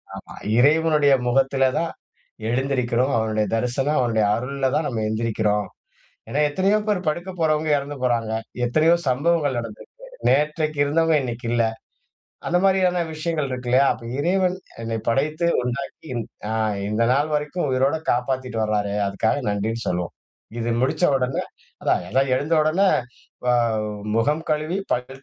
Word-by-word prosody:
ஆமா - - -10 0.2
இறைவனுடைய 150 +1 +4
முகத்தில 135 +1 +2 0.2
தான் 165 0 -1 0.6
எழுந்திருக்கிறோம். 130 0 0
அவனுடைய 110 -1 0
தரிசனம், 130 +6 0
அவனுடைய 115 -3 +2
அருள்ல 135 +3 -2
தான் 155 0 +1
நம்ம 115 -3 -2
எழுந்திரிக்கிறோம். 110 -1 0 0.6
ஏனா 145 - -1
எத்தனையோ 195 +6 +2
பேர் 185 -5 0
படுக்க 175 +5 -2
போறவங்க 155 -1 +1
இறந்து 140 +1 -6
போறாங்க. 115 -3 0 0.3
எத்தனையோ 155 +7 +4
சம்பவங்கள் 145 0 +1
நடந்துருக்கு. 115 -2 -7 0.4
நேற்றைக்கு 150 +1 +1
இருந்தவங்க 160 +2 +2
இன்னைக்கு 120 -1 -5
இல்ல. 120 -1 +3 0.9
அந்த 175 - +2
மாதிரியான 185 -2 +3
விஷயங்கள் 155 -3 -2
இருக்கில்லயா? 125 +2 +2
அப்ப 115 - -10
இறைவன் 185 +3 +1 0.3
என்னை 115 0 -2
படைத்து 155 +7 +1 0.2
உண்டாக்கி 130 +4 -5 0.4
ஆ - - -1 0.4
இந்த 105 +2 0
நாள் 145 +3 +1
வரைக்கும் 150 +3 -1
உயிரோட 135 +4 +2
காப்பாத்திட்டு 125 -1 -1
வறாரே. 105 -1 -1
அதுக்காக 105 +6 0
நன்றினு 110 +3 -2
சொல்வோம். 90 -1 -2 0.5
இது 115 0 -1
முடிச்ச 155 +6 +1
உடனே 130 0 -1 0.4
அதா - - +3 0.2
அதா 135 +3 +3
எழுந்த 150 +5 -2
உடனே 175 +6 +2 0.6
வ - - +1 0.7
முகம் 150 +7 +1
கழுவி, 155 +5 0
பல் 130 +2 -4
135 Hz, 135 wpm, -23 LUFS, 120-155 Hz, 0.9 s, இறைவனுடைய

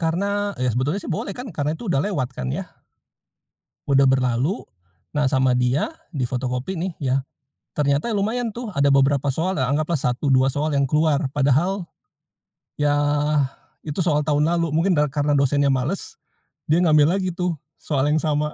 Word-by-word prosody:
Karena 170 +5 0 0.3
ya 125 - +2
sebetulnya 140 - -1
sih - - -3
boleh 195 - -4
kan 255 - -6
karena 150 0 0
itu 240 - -10
udah 135 - +2
lewat 145 -12 -1
kan 65 - -3
ya. - - -4 1.2
Udah 135 -1 +5
berlalu. 130 - +1 0.5
Nah 145 -2 +1
sama 130 -2 +2
dia, 125 - +1 0.2
di 135 -7 -2
fotokopi 125 +4 -3
nih 180 +2 -2
ya. 135 -2 +1 0.6
Ternyata 145 +7 +1
ya 215 - 0
lumayan 225 +4 -1
tuh 235 -3 -5
ada 140 0 +3
beberapa 140 +1 +3
soal 180 +7 -1
ya 130 - +1
anggaplah 155 +2 0
1-2 130 +1 +2
soal 150 +2 -1
yang 140 - +3
keluar, 150 -2 +2
padahal 155 +7 +1 0.9
ya 145 0 +2 0.9
itu 150 +3 -5
soal 150 -4 +2
tahun 150 0 +2
lalu, 170 -1 +1
mungkin 180 +4 +2
da 150 -1 +2
karena 145 +1 0
dosennya 140 +1 +2
males, 145 - -3 0.5
dia 165 +3 +4
ngambil 155 +2 +4
lagi 185 -2 -2
tuh 180 -1 -1 0.3
soal 145 -2 0
yang 155 0 +2
sama. 150 -1 0
145 Hz, 170 wpm, -22 LUFS, 135-170 Hz, 1.2 s, Udah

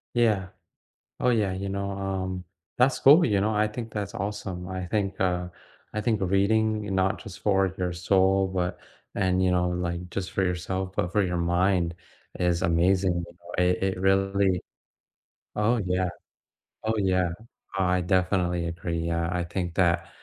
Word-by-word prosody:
Yeah. 105 -6 +2 0.7
Oh, 125 - +2
yeah, 105 -5 +2
you 95 +1 -4
know, 100 0 -3
um, 95 -2 -3 0.3
that's 125 +2 +3
cool, 150 +6 +7
you 100 -4 +2
know, 110 +1 +1
I 105 0 +2
think 115 +1 -6
that's 105 -1 -3
awesome, 100 -4 -4
I 95 -1 -4
think, 100 -2 -1
uh, 90 -1 +1 0.5
I 105 - 0
think 110 -2 0
reading, 105 +2 +1
not 95 +2 +1
just, - - -9
for 95 -2 +3
your 90 -1 -1
soul, 95 +2 +2
but 90 -1 -1 0.4
and, 95 -1 +1
you 90 -1 +3
know, 90 0 +2
like, 90 0 -3
just 95 -2 -4
for 95 - 0
yourself, 95 +1 -2
but 90 +1 -1
for 105 - +3
your 90 -1 -1
mind 85 0 +1 0.5
is 90 0 +1
amazing, 90 +2 +3
you 85 0 -14
know. 85 +1 -2
It 90 +1 +1
it 95 -1 -1
really 95 -1 +2 1.0
Oh, 110 +2 +2
yeah, 90 0 +1 0.8
oh, 110 0 0
yeah. 90 -3 +2 0.5
I 90 -1 +2
definitely 90 -1 +1
agree, 85 0 -3
yeah, 85 0 -1
I 90 -1 -1
think 85 -1 -3
that 85 -2 +2
95 Hz, 165 wpm, -26 LUFS, 90-100 Hz, 1.0 s, cool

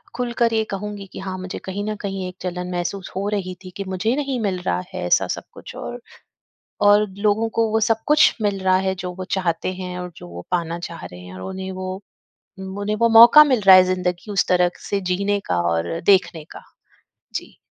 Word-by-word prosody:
खुलकर 235 -1 0
ये 220 0 +2
कहूँगी 205 0 -5
कि - - -7
हाँ, 190 -1 -5
मुझे 185 0 -6
कहीं 195 +2 -4
न - - -3
कहीं 195 -2 -4
एक 180 - -13
जलन 180 0 -4
महसूस 180 +2 -4
हो 195 +2 -2
रही 190 -3 -3
थी 185 - -9
कि 200 - -3
मुझे 190 +6 0
नहीं 275 -3 -2
मिल 195 -4 -1
रहा 90 - -1
है - - -4
ऐसा - - +3
सब - - -4
कुछ - - -11
और, - - -6 0.8
और 205 +1 +5
लोगों 215 +2 +1
को 225 -1 +3
वो 220 - +2
सब 225 0 +1
कुछ 300 +1 +5
मिल 200 -2 0
रहा 185 0 +4
है 190 - 0
जो 180 0 -4
वो 185 0 -6
चाहते 180 0 -1
हैं 180 -1 -6
और 180 0 -6
जो - - -10
वो 85 0 -9
पाना 170 -1 -1
चाह 170 - -9
रहे 90 - -10
हैं 90 0 -11
और 95 - -9
उन्हें 190 0 -5
वो 185 0 -5 0.7
उम, 190 0 -7
उन्हें 205 +1 -1
वो 230 - +5
मौका 235 +6 +10
मिल 260 -6 +1
रहा 190 - +11
है 185 - +7
ज़िन्दगी 180 +2 -3
उस 200 -1 +1
तरह 180 -1 +3 0.2
से 200 -1 0
जीने 200 +2 0
का 90 - 0
और 85 +1 -2
देखने 180 -5 +3
का। - - -10 0.7
जी। - - -6
190 Hz, 220 wpm, -21 LUFS, 180-210 Hz, 0.8 s, रहा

